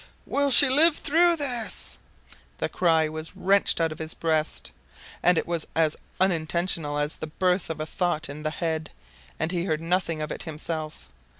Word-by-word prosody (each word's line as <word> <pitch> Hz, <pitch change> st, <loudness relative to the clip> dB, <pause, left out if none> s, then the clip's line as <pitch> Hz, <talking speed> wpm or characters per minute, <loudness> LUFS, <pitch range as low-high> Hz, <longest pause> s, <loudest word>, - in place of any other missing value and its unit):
"Will 285 Hz, 0 st, +1 dB
she 280 Hz, +1 st, +9 dB
live 300 Hz, +5 st, +5 dB
through 340 Hz, +3 st, +3 dB
this?" 250 Hz, -7 st, -2 dB, 0.6 s
The -, -, -2 dB
cry 165 Hz, -3 st, +2 dB
was 155 Hz, +1 st, -7 dB
wrenched 200 Hz, -1 st, +2 dB
out 165 Hz, -1 st, +1 dB
of 155 Hz, -, -8 dB
his 160 Hz, 0 st, -3 dB
breast. 160 Hz, -2 st, -1 dB, 0.5 s
It 180 Hz, -2 st, +4 dB
was 170 Hz, -2 st, -2 dB
as 160 Hz, -2 st, +2 dB, 0.2 s
unintentional 170 Hz, -3 st, +1 dB
as 145 Hz, +1 st, 0 dB
the 155 Hz, -, -5 dB
birth 180 Hz, +3 st, 0 dB
of 160 Hz, -1 st, -4 dB
a 155 Hz, -, -2 dB
thought 160 Hz, -1 st, -1 dB
in 145 Hz, +2 st, -8 dB
the 155 Hz, -, -1 dB
head, 160 Hz, 0 st, -3 dB, 0.5 s
and 160 Hz, +1 st, -1 dB
he 175 Hz, -1 st, -2 dB
heard 155 Hz, -5 st, -1 dB
nothing 165 Hz, -1 st, -1 dB
of 155 Hz, -, -4 dB
it -, -, -5 dB
himself. 155 Hz, -1 st, -6 dB
165 Hz, 175 wpm, -25 LUFS, 155-185 Hz, 0.6 s, she